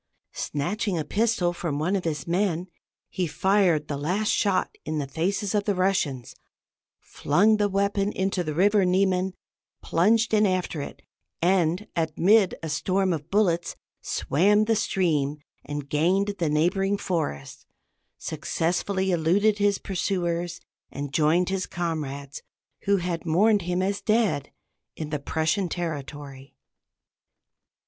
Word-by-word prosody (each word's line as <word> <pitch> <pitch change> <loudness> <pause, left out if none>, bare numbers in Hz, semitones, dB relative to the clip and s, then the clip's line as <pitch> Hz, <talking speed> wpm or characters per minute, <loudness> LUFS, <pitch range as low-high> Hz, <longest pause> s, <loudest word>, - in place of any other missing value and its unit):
Snatching 185 +6 -2
a 155 - -2
pistol 210 -5 +1
from 170 -4 -3
one 170 +7 0
of 190 - -2
his 150 -4 -2
men, 175 -1 0 0.4
he 180 -2 -2
fired 185 -3 +2
the 145 - -3
last 185 +9 0
shot 200 -2 +1
in 155 0 -3
the 145 - -1
faces 185 +8 -2
of 205 -1 +1
the 205 - +1
Russians, 180 -10 0 0.7
flung 205 +9 +2
the 205 -1 +1
weapon 200 +1 0
into 190 -2 -1
the 155 -2 -4
river 200 +3 +4
Niemen, 185 0 +1 0.5
plunged 220 +7 +2
in 210 -1 +4
after 185 -4 -1
it, - - -8 0.4
and 180 +1 +2
amid 180 +5 +3
a - - -3
storm 185 +4 0
of 155 0 -5
bullets 175 -5 +1 0.3
swam 205 +8 +2
the 225 0 +2
stream, 150 -8 0 0.3
and 145 0 -5
gained 180 +8 +1
the 165 -3 +1
neighboring 190 +6 +1
forest, 70 - -4 0.5
successfully 190 +3 -1
eluded 195 +6 +2
his 200 -1 +3
pursuers, 175 -2 -2 0.3
and 140 -1 -6
joined 165 +4 +3
his 190 -1 -2
comrades, 145 -5 -4 0.4
who 200 0 +3
had 175 -2 -3
mourned 200 +6 +3
him 180 +1 -1
as 200 +1 -1
dead, 215 - +1 0.4
in 155 -2 -6
the 150 - -1
Prussian 160 +6 -1
territory. 145 -5 -6
180 Hz, 135 wpm, -25 LUFS, 155-200 Hz, 0.7 s, river